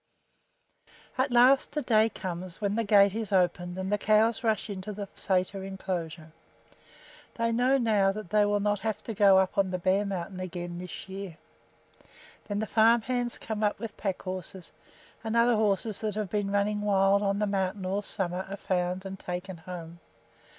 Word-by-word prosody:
At 260 +2 +1
last 260 +4 +4
a 300 - 0
day 220 -2 +4
comes 180 -3 -6
when 200 -1 -1
the 230 - +1
gate 200 -2 +5
is 220 -2 -4
opened 180 -1 +1
and 190 +1 -3
the 210 - +1
cows 215 +3 +3
rush 220 -2 0
into 200 0 -6
the 205 0 -5
sæter 190 0 0
inclosure. 175 -5 -5 1.0
They 230 0 0
know 250 +4 +3
now 210 -6 +3
that 205 -3 -8
they 210 0 +4
will 205 0 +1
not 205 0 0
have 220 0 -2
to 225 - -5
go 200 -2 +6
up 190 +1 +1
on 195 -1 +2
the 185 - -2
bare 190 +3 +2
mountain 185 -1 -4
again 175 -1 -5
this 180 +1 -8
year. 190 -3 -7 1.1
Then 205 -2 -3
the 220 - -1
farm 225 +2 +4
hands 245 -1 -2
come 220 -1 -4
up 210 - +1
with 225 0 -7
pack 195 -3 -3
horses, 185 -1 -7 0.5
and 225 0 -2
other 235 0 +4
horses 210 0 0
that 215 -2 -2
have 210 -4 -3
been 205 -1 -1
running 205 +1 0
wild 200 -1 +3
on 200 -1 0
the 210 - +1
mountain 195 -1 -2
all 195 +2 -1
summer 190 -3 -3
are 200 - -5
found 180 0 -2
and 195 0 -6
taken 180 +1 -5
home. 170 0 -9
200 Hz, 185 wpm, -28 LUFS, 185-215 Hz, 1.1 s, go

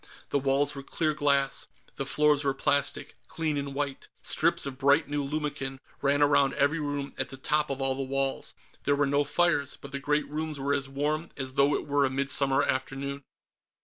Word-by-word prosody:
The 140 - +1
walls 140 +1 +2
were 140 - -6
clear 155 +3 -1
glass. 140 -2 +1 0.3
The - - -3
floors 150 -1 +3
were 135 -1 +1
plastic, 145 0 +1
clean 160 -2 -2
and 140 -1 -3
white. 140 -1 -3 0.2
Strips - - +2
of 135 -1 -6
bright 140 +2 +4
new 145 0 -1
lumicon 140 -2 -3 0.2
ran 145 +1 +3
around 140 -1 +3
every 145 +3 +2
room 145 -1 -3
at - - -1
the 135 - -8
tops 150 +3 +1
of 135 0 -2
all 135 0 +2
the 135 - -3
walls. 135 0 -2 0.3
There 145 - +2
were 145 0 +2
no 140 +1 +2
fires, 145 -2 +1
but 140 - -10
the 140 - -3
great 150 +1 0
rooms 155 0 -4
were 140 +1 0
as 140 -1 -2
warm 150 +4 -1
as 130 -2 -4
though 140 +1 +4
it - - -2
were 145 -1 +2
a 135 - +2
midsummer 135 0 +2
afternoon. 135 +2 -2
140 Hz, 200 wpm, -28 LUFS, 135-145 Hz, 0.3 s, bright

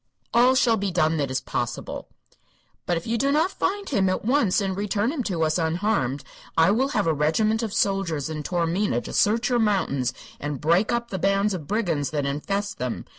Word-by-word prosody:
"All 245 +3 +5
shall 235 -3 +3
be 200 -1 -1
done 165 -2 +1
that 140 -3 -1
is 130 -1 -1
possible." - - -4 0.8
"But 175 - +1
if 165 - -6
you 230 0 -1
do 275 +1 +2
not 315 +6 +2
find 400 +1 -2
him 195 -8 +1
at 185 - -2
once, 235 -6 +3
and 195 -2 -1
return 205 +4 0
him 300 -4 -2
to 170 -5 -1
us 155 +2 +1
unharmed, 160 - 0 0.3
I 165 +4 +5
will 255 +6 +2
have - - +2
a 165 - +2
regiment 215 +10 +1
of 225 -3 -3
soldiers 195 -9 0
in 155 -1 -4
Taormina 175 +5 0
to - - -8
search 225 +5 +2
your 245 -1 +2
mountains 185 - +1 0.3
and 145 -2 -4
break 170 +9 +2
up 235 0 -2
the 190 - -3
bands 195 +2 +2
of 160 -6 -6
brigands 175 -10 0
that 145 -2 -2
infest 200 +9 -2
them. 125 -1 -3
195 Hz, 205 wpm, -24 LUFS, 160-220 Hz, 0.8 s, All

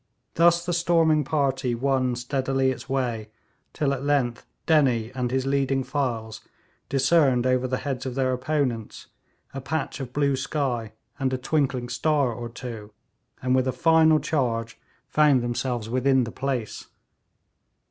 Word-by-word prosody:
Thus 170 +1 +4
the 175 - -1
storming 165 -3 +3
party 135 -4 0
won 130 0 0
steadily 130 +1 0
its 130 - -8
way, 120 -5 -2 0.4
till 140 -2 0
at 135 -1 -4
length 135 -5 0 0.2
Dennie 130 -8 +2
and 125 -1 -2
his 130 +1 -1
leading 135 -1 +1
files 125 -5 -3 0.5
discerned 135 -3 +3
over 130 0 +2
the 130 0 -1
heads 135 -2 -4
of 125 - -5
their 130 -1 +1
opponents 125 -4 -2 0.5
a 135 - -5
patch 150 +2 -3
of 130 -3 -6
blue 140 0 +1
sky 130 -5 -2 0.3
and 135 -1 0
a - - 0
twinkling 130 -2 -1
star 145 -2 +1
or 120 +1 -6
two, 115 -3 -8 0.5
and 130 0 +2
with 130 0 +2
a - - +2
final 160 +1 +4
charge 115 -7 -2 0.3
found 145 -2 +3
themselves 120 -1 -2
within 130 +2 +2
the 115 - -5
place. 130 -4 -4
130 Hz, 145 wpm, -25 LUFS, 125-145 Hz, 0.5 s, Thus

